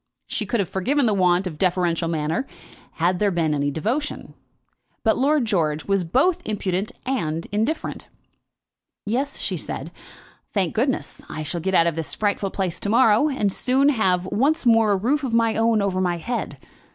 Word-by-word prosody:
She - - -3
could 235 - 0
have 195 - 0
forgiven 260 - 0
the 215 - +2
want 180 -1 +2
of 160 -5 -6
deferential 175 -2 +1
manner, 165 - -1 0.5
had 175 +2 0
there 210 - +3
been 165 -4 0
any 145 -1 0
devotion; 230 - -3 0.7
but 220 - +3
Lord 280 0 +2
George 160 -8 0
was 195 -2 +1
both 290 - +2
impudent 195 -1 -2
and 165 -11 -2
indifferent. 220 +10 -2 1.0
"Yes," 260 +7 -1
she - - -2
said. - - -5 0.6
"Thank 190 -5 0
goodness, 250 +4 -1
I 155 - -5
shall 165 +3 -3
get 190 +2 0
out 165 - +5
of 170 -2 0
this 165 -1 -4
frightful 205 -1 0
place 185 -3 -2
to 200 - -3
morrow, 230 +4 +4
and 210 -9 0
soon 270 +3 +2
have 185 -9 +1
once 275 - +1
more 225 -3 +5
a - - +2
roof 270 +9 0
of 240 -4 -1
my 230 -1 +2
own 225 -2 +2
over 185 -2 0
my 175 -2 0
head. 235 +9 -4
200 Hz, 175 wpm, -23 LUFS, 175-245 Hz, 1.0 s, out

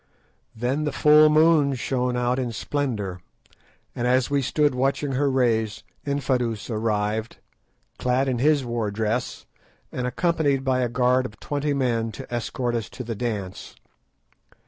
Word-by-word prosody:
Then 130 +7 -1
the 150 - -1
full 150 +2 +6
moon 155 -2 +4
shone 125 0 -1
out 125 +1 0
in 125 -2 -2
splendour, 110 -11 -3 0.7
and 120 - -1
as 125 +1 +2
we 140 -1 +2
stood 145 +2 +1
watching 135 +2 0
her 140 +2 +1
rays, 115 -5 +1 0.2
Infadoos 125 -5 -1
arrived, 110 0 -1 0.6
clad 125 +2 +1
in 125 -3 0
his 145 0 +3
war 120 -3 -2
dress, 110 +4 -2 0.5
and 125 0 -2
accompanied 145 -1 +1
by 130 -1 +1
a 120 - 0
guard 125 +1 +2
of 105 -1 -17
twenty 145 0 -2
men 115 -4 0
to 120 - -9
escort 120 +1 -2
us 115 -5 -2
to 130 - -7
the 115 -1 -4
dance. 105 -5 -5
125 Hz, 145 wpm, -24 LUFS, 115-140 Hz, 0.7 s, full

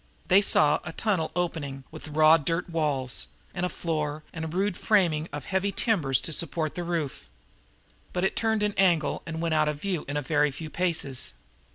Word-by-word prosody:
They 190 +2 +7
saw 150 -6 +4
a 160 - -6
tunnel 190 -7 0
opening, 150 -6 -2
with 155 0 -9
raw 155 +1 +6
dirt 165 +3 -2
walls 140 - 0 0.3
and 180 0 -2
floor 155 -2 -2
and 160 - -5
a - - -3
rude 190 +4 -1
framing 170 -8 +2
of 145 0 -6
heavy 195 +1 0
timbers 165 - +2
to 165 - -2
support 160 -1 +1
the 175 - -4
roof. 170 -5 -3 0.8
But 180 - -2
it 190 - +1
turned 220 -2 +1
an 210 0 +1
angle 170 -6 +2
and 160 0 -4
went 165 -1 0
out 155 -1 +3
of 150 -1 -4
view 180 -3 -2
in 145 +1 -2
a 145 - -2
very 150 +1 +2
few 155 +3 -8
paces. 160 -7 -1
160 Hz, 190 wpm, -27 LUFS, 150-180 Hz, 0.8 s, They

